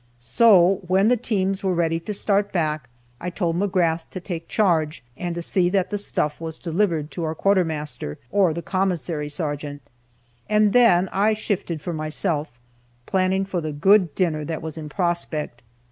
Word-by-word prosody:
So, 180 - +4
when 190 +4 +3
the 250 - +5
teams 195 -5 -1
were 190 -2 +1
ready 165 -1 +1
to 210 +5 -5
start 200 0 +1
back, 155 -6 -1 0.3
I 180 - -4
told 170 -2 -1
McGrath 175 -4 +1
to 185 - -6
take 170 -2 -6
charge, 165 - +1
and 175 +3 -4
to 170 - -3
see 175 0 +1
that 190 0 0
the 205 - -1
stuff 150 -6 -1
was 160 -1 -5
delivered 165 -3 -1
to 170 - -4
our 160 0 -2
quartermaster, 160 - 0
or 195 -4 +3
the 170 +2 -5
commissary 175 -5 -1
sergeant, 145 -2 -4 0.7
and 210 -1 +3
then 190 -7 +5
I 210 +3 +2
shifted 180 -6 -3
for 175 - -4
myself, 155 -4 -2 0.5
planning 190 +1 +1
for 190 -3 -3
the 155 -1 -3
good 180 +3 +3
dinner 160 -5 0
that 160 +1 -4
was 160 -2 -5
in 155 -2 -7
prospect. 165 -7 -2
175 Hz, 170 wpm, -23 LUFS, 155-195 Hz, 0.7 s, the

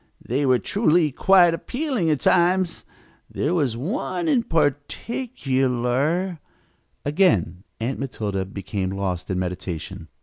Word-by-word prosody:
They 135 +4 0
were 130 -1 +5
truly 170 - +2
quite 175 +4 +5
appealing 245 - -2
at 150 -5 +1
times. 180 0 +2 0.4
There 150 +5 -1
was 140 -10 0
one 245 - -2
in 275 -6 +3
particular 145 - -1 0.3
" - - -44
Again 145 - +2 0.2
Aunt 120 +4 -2
Matilda 105 -7 -3
became 95 0 -4
lost 95 -2 -3
in 95 - -1
meditation. 90 -2 -5
145 Hz, 115 wpm, -23 LUFS, 110-180 Hz, 0.4 s, were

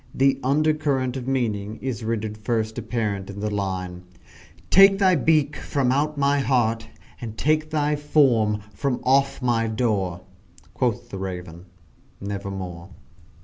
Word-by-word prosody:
The 135 0 +3
under 155 +4 +3
current 135 -4 -1
of 130 -1 -5
meaning 110 -5 -1
is 125 -5 -4
rendered 110 -1 -2
first 110 +1 -2
apparent 105 -4 -3
in 100 0 -7
the 105 +1 -2
line 90 -3 -3 0.7
"Take 195 +1 +7
thy 190 -2 +4
beak 155 -1 +2
from 135 -4 0
out 145 +3 0
my 140 0 +2
heart, 115 -4 +1 0.3
and 110 -2 -6
take 155 +1 +1
thy 150 -1 +1
form 125 -8 +2
from 130 +4 -1
off 135 +1 +2
my 115 -2 +1
door!" 105 -6 -1 0.5
Quoth - - -1
the 95 - -5
Raven 90 -2 -6 0.5
"Nevermore!" 95 -3 -6
120 Hz, 140 wpm, -24 LUFS, 100-140 Hz, 0.7 s, Take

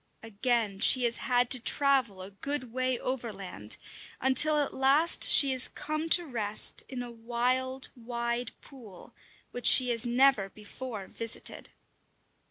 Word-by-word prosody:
Again 225 -2 -3
she 250 +4 +6
has 235 -1 0
had 245 -1 -1
to 255 - +6
travel 255 -7 0
a 190 - -12
good 255 +3 -6
way 255 0 -2
overland, 200 - -5 0.4
until 300 +4 +3
at 290 -1 -2
last 280 +5 +3
she 275 -2 +5
has 260 -1 +1
come 310 +2 -6
to 350 +1 +5
rest 215 -7 -2
in 250 -2 -7
a 240 - -10
wild, 250 +3 -2
wide 235 0 -5
pool, 225 -10 -16 0.4
which 245 - -1
she 255 -1 +8
has 230 -2 +1
never 245 -4 +1
before 215 +1 -10
visited. 230 +3 -6
245 Hz, 140 wpm, -27 LUFS, 225-265 Hz, 0.4 s, she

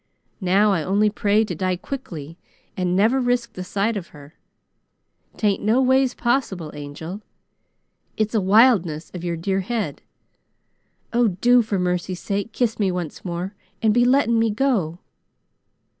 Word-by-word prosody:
Now 195 +3 +3
I 180 -5 +1
only 205 +5 +2
pray 210 +1 +2
to - - -4
die 185 -1 -1
quickly 175 - -7 0.4
and 180 -1 0
never 225 +7 +3
risk 245 -1 0
the 185 - -6
sight 205 +4 -1
of 185 -4 -5
her. 145 0 -15 1.0
'Tain't 205 -2 +1
no 220 +4 +2
ways 260 0 +3
possible, 230 - -1
Angel! 150 +7 -7 1.0
It's 215 0 0
a 220 - +2
wildness 190 -6 +3
of 180 -2 -7
your 170 -1 -2
dear 190 +3 -1
head. 220 +3 -3 1.1
Oh, 240 0 +4
do 240 +6 +4
for 215 -3 -2
mercy 180 0 -1
sake, 200 +4 -3
kiss 235 -3 -1
me 195 -3 +2
once 180 -4 -5
more 180 +2 -4 0.3
and 215 -1 +4
be 240 +2 +4
letting 245 -3 +3
me 225 0 +2
go!" 210 - 0
200 Hz, 150 wpm, -22 LUFS, 180-230 Hz, 1.1 s, Oh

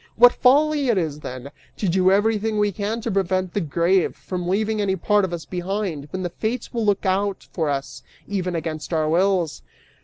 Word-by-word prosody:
What 245 +1 +7
folly 290 +2 +3
it 230 - +3
is, 155 -5 -1
then, 130 -1 -7 0.3
to 205 - -1
do 185 +1 +3
everything 215 +2 +2
we 210 0 +2
can 210 +4 -3
to 230 - -3
prevent 185 -1 0
the 205 - 0
grave 170 +4 +1
from 180 -2 -5
leaving 215 +3 0
any 195 -2 +1
part 205 +3 +2
of 190 - -1
us 170 -2 -5
behind 180 -4 -3
{when 185 +3 -4
the 175 - -2
Fates 230 +6 -3
will 230 -1 -1
look 205 0 +1
out 195 +1 0
for 160 -4 -1
us, 135 -2 -3 0.3
even 185 -3 -2
against 160 -1 -4
our 155 -1 +1
wills." 175 0 +1
190 Hz, 195 wpm, -23 LUFS, 170-210 Hz, 0.3 s, What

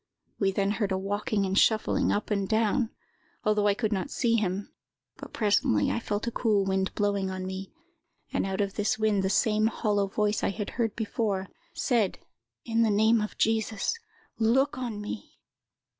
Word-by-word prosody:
We 195 -2 +2
then 195 +1 0
heard 205 -2 -1
a 190 - +1
walking 200 +1 -1
and 190 0 -1
shuffling 215 +1 +3
up 210 +1 -2
and 200 -2 0
down, 225 +2 +2 0.5
although 210 -1 +2
I 200 - +3
could 215 -1 -1
not 200 +8 -2
see 235 -4 +1
him; 200 -2 -1 0.4
but - - -10
presently 200 - +2
I - - 0
felt 210 -1 -3
a 235 - -2
cool 210 -4 +1
wind 190 0 0
blowing 200 -2 0
on 185 0 -4
me, 190 +1 -6 0.6
and - - +1
out 195 +1 -1
of 200 -1 -1
this 210 0 0
wind 215 -2 +2
the 190 - 0
same 215 +1 +3
hollow 205 -2 0
voice 210 +1 0
I - - +2
had 205 +1 -4
heard 225 -3 -1
before, 210 -4 -2 0.3
said, 230 -7 +1 0.5
'In 230 -1 +1
the 225 - +4
name 220 +2 +4
of 210 - -4
Jesus, 220 -2 +1 0.5
look 260 +6 +3
on 240 -4 -4
me! 210 +1 -7
210 Hz, 180 wpm, -28 LUFS, 195-220 Hz, 0.6 s, the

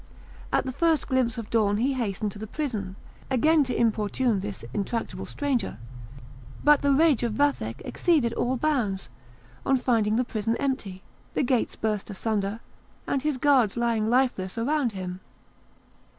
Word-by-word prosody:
At - - +2
the 260 - -2
first 325 +3 +1
glimpse 255 -4 +1
of 225 -2 -6
dawn 205 -3 +2
he 260 +5 +1
hastened 210 -4 -2
to 205 - -11
the 220 - -6
prison, 215 -10 -3 0.3
again 300 +4 +4
to 250 - -2
importune 225 0 +1
this 200 +1 -6
intractable 215 +3 -3
stranger; 265 - -1 0.9
but 295 -1 +6
the 285 - +3
rage 290 -2 +4
of 235 -3 -1
Vathek 210 - 0
exceeded 290 -10 +1
all 250 +2 0
bounds 235 -10 0 0.5
on 270 - +3
finding 225 -4 +2
the 250 +2 +1
prison 225 -1 -1
empty, 210 -9 -3 0.3
the - - +2
gates 250 -2 +1
burst 215 -2 -2
asunder, 205 +1 -2 0.4
and 275 - 0
his 300 -1 0
guards 255 -6 +3
lying 230 -2 +1
lifeless 240 -6 +1
around 260 0 +1
him. 185 -1 -5
235 Hz, 150 wpm, -26 LUFS, 210-270 Hz, 0.9 s, but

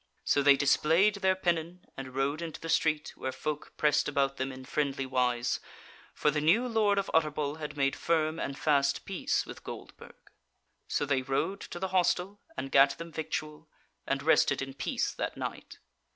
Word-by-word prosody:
So 140 - +2
they 140 0 +6
displayed 165 +9 +3
their 190 -1 +2
pennon, 175 -1 -2
and 130 -1 -8
rode 140 +4 0
into 165 -2 -6
the 165 - -7
street, 155 -2 +1
where 130 - -4
folk 150 +2 -5
pressed 150 0 +2
about 140 -2 0
them 130 +1 -2
in 130 0 -10
friendly 135 -1 -1
wise; 125 -2 0 0.6
for 150 - +2
the 150 0 -1
new 200 +12 +3
Lord 215 -4 +2
of 195 - -1
Utterbol 150 -1 0
had 150 -1 -6
made 135 -1 +1
firm 160 -1 0
and 140 - -3
fast 140 -2 +1
peace 195 -2 -1
with - - -10
Goldburg. - - -10 0.7
So - - 0
they 135 -2 +1
rode 155 +9 -1
to - - -7
the 190 +1 -3
hostel, 185 +2 +1 0.2
and 135 +1 -4
gat 140 0 +5
them 165 0 -8
victual, 155 -1 -5 0.4
and - - -1
rested - - +4
in 135 0 -4
peace 140 0 -2
that - - -4
night. - - -6
150 Hz, 180 wpm, -30 LUFS, 135-170 Hz, 0.7 s, they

